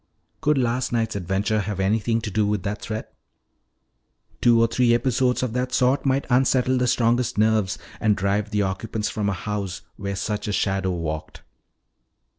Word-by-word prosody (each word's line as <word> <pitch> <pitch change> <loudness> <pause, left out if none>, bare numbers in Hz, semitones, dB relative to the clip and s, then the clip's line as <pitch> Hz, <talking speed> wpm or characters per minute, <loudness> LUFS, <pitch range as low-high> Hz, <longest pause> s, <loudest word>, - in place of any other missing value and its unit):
Could 150 -1 +2
last 125 0 0
night's 115 -2 0
adventure 100 +3 0
have 105 -1 -3
had 95 - 0
anything 110 +3 +1
to 105 -2 -4
do 105 +1 +1
with 105 -3 -1
that 105 +2 -3
threat? 110 0 -5 1.3
Two 120 -1 +5
or 115 - +5
three 120 +1 +3
episodes 125 +1 +1
of 125 -3 -2
that 125 +1 -1
sort 135 +2 +2
might 135 +1 +1
unsettle 130 0 +3
the 125 - +1
strongest 120 0 +1
nerves 110 -3 +2 0.2
and 105 -2 +2
drive 100 +2 0
the 105 -1 +1
occupants 105 +3 -2
from 105 -2 -1
a - - 0
house 100 0 -4
where 100 -1 -4
such 105 +2 -3
a - - -1
shadow 95 -1 0
walked. 80 -3 -4
110 Hz, 175 wpm, -23 LUFS, 100-125 Hz, 1.3 s, Two